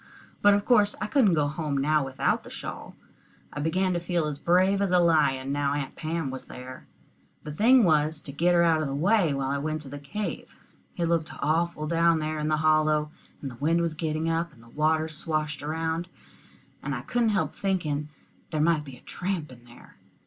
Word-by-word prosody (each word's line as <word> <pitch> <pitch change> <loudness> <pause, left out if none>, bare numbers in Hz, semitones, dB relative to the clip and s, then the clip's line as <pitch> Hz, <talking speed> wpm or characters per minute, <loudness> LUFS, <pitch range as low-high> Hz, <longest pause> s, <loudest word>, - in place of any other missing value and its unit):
But 205 0 +6
of 205 - -1
course 210 -4 +4
I - - -2
couldn't 210 - +3
go 150 -2 +2
home 150 -1 -3
now 150 +2 +2
without 135 0 -1
the - - -11
shawl. - - -8 0.6
I - - -5
began 185 +5 +1
to 175 - 0
feel 170 -1 -1
as 150 -2 -4
brave 185 +4 +3
as 200 - +1
a 180 - +5
lion 150 -6 +2
now 145 0 0
Aunt 140 -2 -4
Pam 160 -3 -3
was 130 - -7
there. 130 0 -10 0.6
The 150 - -6
thing 235 - +5
was 155 -3 +2
to 140 - -6
get 175 +5 +2
her 170 - +5
out 165 -2 +3
of 155 - -1
the 135 - -3
way 180 +2 +3
while 135 -1 -1
I 140 - -1
went 155 +1 -3
into - - -8
the 145 +1 -7
cave. 205 +9 -5 0.4
It 170 - 0
looked 165 -1 0
awful 160 +1 0
down 165 +1 +3
there 155 0 -2
in 150 - -2
the 155 0 +2
hollow, 155 -1 +2 0.3
and 135 - -4
the - - -11
wind 165 +3 +2
was 165 -2 -1
getting 155 0 -2
up, 165 -4 -2
the 115 0 -17
water 155 +4 +1
swashed 155 -2 -3
around, 160 +3 -2 0.7
and - - -3
I - - -4
couldn't 240 -2 +1
help 195 -3 0
thinking 155 -7 -2 0.4
there 155 - -2
might 155 -1 +2
be 135 -3 -11
a - - -20
tramp 180 -6 -4
in 120 -1 -15
there. 120 0 -17
155 Hz, 210 wpm, -27 LUFS, 145-170 Hz, 0.7 s, But